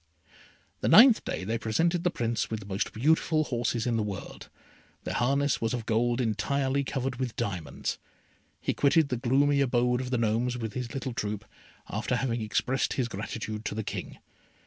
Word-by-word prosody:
The - - -1
ninth 235 +1 +8
day - - -3
they 110 +4 -2
presented 165 +11 +1
the 180 - +3
Prince 120 -7 -1
with 110 - -3
the 100 - -11
most 95 0 -2
beautiful 155 +5 +2
horses 120 -4 -1
in 120 -2 +1
the - - +1
world. 105 -2 -6 0.5
Their - - -3
harness 135 0 +1
was 115 +2 0
of 115 -3 -5
gold 120 +2 +1
entirely 130 +5 0
covered 130 -1 -3
with 125 -4 -3
diamonds. 95 -9 -3 0.6
He - - -1
quitted 145 +1 +3
the 125 - -1
gloomy 140 +4 +3
abode 125 -1 +2
of 130 - -5
the 125 - 0
Gnomes 115 +2 0
with 110 -3 -4
his 125 -1 -5
little 130 -2 -3
troop, 105 -2 -3 0.4
after - - -1
having 120 -2 -1
expressed 125 +5 0
his 125 -3 0
gratitude 110 +1 -5
to - - -3
the 110 - -2
King. - - -5
120 Hz, 180 wpm, -28 LUFS, 110-135 Hz, 0.6 s, ninth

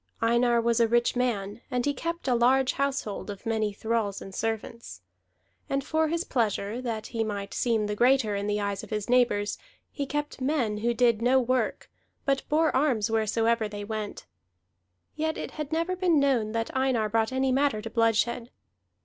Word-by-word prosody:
Einar 235 +1 +3
was 235 0 +2
a 230 - +4
rich 240 +2 +2
man, 225 -4 -1
and 250 -2 -1
he 285 - +1
kept 335 0 -4
a 255 - +3
large 255 +2 +3
household 275 -8 -2
of 200 +3 -8
many 220 -2 0
thralls 215 -1 -1
and 195 - -10
servants. 225 - -4 0.7
And 275 0 0
for 315 +2 +1
his 335 +2 -1
pleasure, 220 - -1
that 225 -4 -3
he 225 -1 0
might 200 -2 -4
seem 225 -3 +1
the 210 0 -2
greater 240 -2 +3
in 200 +1 -2
the 210 0 0
eyes 200 -1 -2
of - - -11
his 210 -2 -3
neighbors, 240 -5 +2 0.3
he 280 -2 -4
kept 295 -1 -3
men 255 -6 0
who 235 +2 0
did 235 -2 +3
no 255 +2 +4
work, 255 0 -1 0.4
but 275 -1 +2
bore 315 0 +2
arms 255 -7 +2
wheresoever 225 +1 +1
they 205 0 -6
went; 215 0 -5 0.9
yet 315 +1 -1
it - - -5
had 305 -1 -6
never 335 +3 0
been 355 -4 +3
known 255 -6 +2
that 230 +2 -3
Einar 260 -4 +1
brought 220 +1 +1
any 260 0 +1
matter 270 -4 +2
to 220 +2 -6
bloodshed. 230 +1 +1
235 Hz, 185 wpm, -27 LUFS, 215-265 Hz, 0.9 s, a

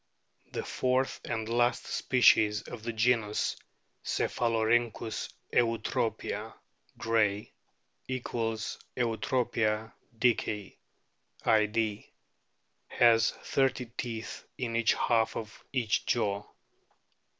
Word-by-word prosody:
The - - -3
fourth 130 +1 0
and 110 -2 -3
last 120 +1 +1
species 110 -4 +4
of 120 - -8
the 115 +2 -3
genus 110 -2 +1 0.5
Cephalo 115 -2 0
rhynclms 115 -1 0 0.2
eutropia, 115 0 0 0.4
Gray| 105 -2 +1 0.3
( - - -47
= - - -42
Eutropia 115 -1 -1 0.2
dickei, 110 -4 0 0.7
Id.), 105 -1 +1 0.8
has 115 -2 +5
thirty 130 -2 0
teeth 115 -2 -5
in 115 -2 -2
each 115 0 +3
half 115 -2 +1
of 110 -2 -8
each 120 -6 +1
jaw. 100 -3 0
115 Hz, 90 wpm, -30 LUFS, 110-120 Hz, 0.8 s, has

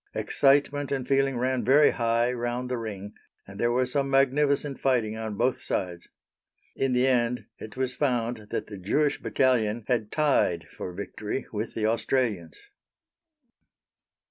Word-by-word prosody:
Excitement 145 0 +2
and 135 -2 -2
feeling 135 -1 +2
ran 130 0 0
very 145 +6 +5
high 115 0 +1
round 120 +1 -3
the 125 - 0
ring, 105 -2 -6 0.3
and 100 +1 -12
there 120 0 +2
was 125 +1 +1
some 140 0 0
magnificent 140 +1 +2
fighting 120 -5 +1
on 110 -1 -5
both 125 +2 +1
sides. 90 -2 -3 0.7
In 135 -1 0
the 125 +1 +3
end 125 -1 +1
it 110 - -10
was 130 -1 0
found 120 -5 -1
that - - -3
the 105 -2 -9
Jewish 145 +10 0
Battalion 120 -4 +1
had 115 -4 0
tied 145 - +1
for 90 - -6
victory 100 +6 -5
with 110 +1 -4
the 110 - -1
Australians. 110 -5 -1
125 Hz, 145 wpm, -27 LUFS, 110-135 Hz, 0.7 s, very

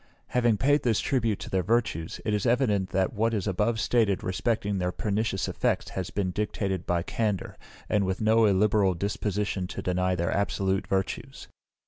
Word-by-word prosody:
Having 120 -3 +2
paid 145 +7 +3
this 115 -4 +1
tribute 115 -6 0
to - - -6
their 95 - +2
virtues, 105 -5 -1
it 105 - 0
is 105 -2 0
evident 115 -6 +2
that 95 +2 0
what 115 +1 +1
is 100 - -2
above 105 +4 0
stated 110 -3 +2
respecting 100 +1 -1
their 90 0 0
pernicious 105 0 -1
effects - - -1
has 95 -2 -4
been 95 -3 -1
dictated 95 -2 -2
by 85 -1 +1
candour, 105 -1 -2 0.3
and 105 -1 +2
with 95 0 -1
no 110 +1 +4
illiberal 100 -1 +3
disposition 100 0 -2
to - - -6
deny 90 0 +1
their 85 0 -1
absolute 95 -1 0
virtues. 95 -1 -3
100 Hz, 170 wpm, -27 LUFS, 95-110 Hz, 0.3 s, no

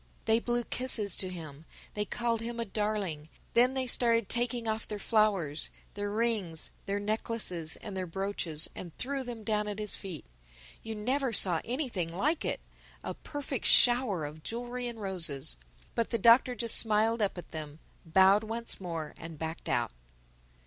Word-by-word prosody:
They 225 0 +4
blew 240 0 -1
kisses 235 -5 +3
to 185 - +2
him. 160 -4 -9 0.3
They 210 0 -1
called 230 +1 -1
him 235 +1 -5
a 230 - -1
darling. 200 -7 -2 0.2
Then 250 +3 +4
they 260 -1 0
started 230 -3 +3
taking 240 -1 0
off 220 0 -2
their 210 - -4
flowers, 200 -9 +2 0.2
their 205 0 -3
rings, 210 -7 0 0.2
their 200 +1 0
necklaces, 205 -6 -2
and 205 -3 -8
their 185 -1 -3
brooches 175 -4 -1
and 175 -3 -8
threw 275 +1 -2
them 240 -3 -7
down 210 0 0
at 205 -1 -4
his 210 -1 -1
feet. 175 -8 -7 0.6
You 225 0 -6
never 255 +5 0
saw 180 -6 +4
anything 240 - -2
like 285 - 0
it—a - - -6
perfect 280 -4 -5
shower 240 - +6
of 150 +2 -8
jewelry 245 +5 -4
and 235 -2 -7
roses. 165 - 0 0.4
But 230 - 0
the 230 - 0
Doctor 235 +3 +5
just 230 0 +5
smiled 220 +1 +2
up 200 -2 0
at 175 - -9
them, 155 -2 -6 0.3
bowed 190 +5 +5
once 225 -1 -5
more 165 -4 -5
and 165 -1 -8
backed 160 +2 -5
out. - - 0
210 Hz, 165 wpm, -30 LUFS, 180-235 Hz, 0.6 s, shower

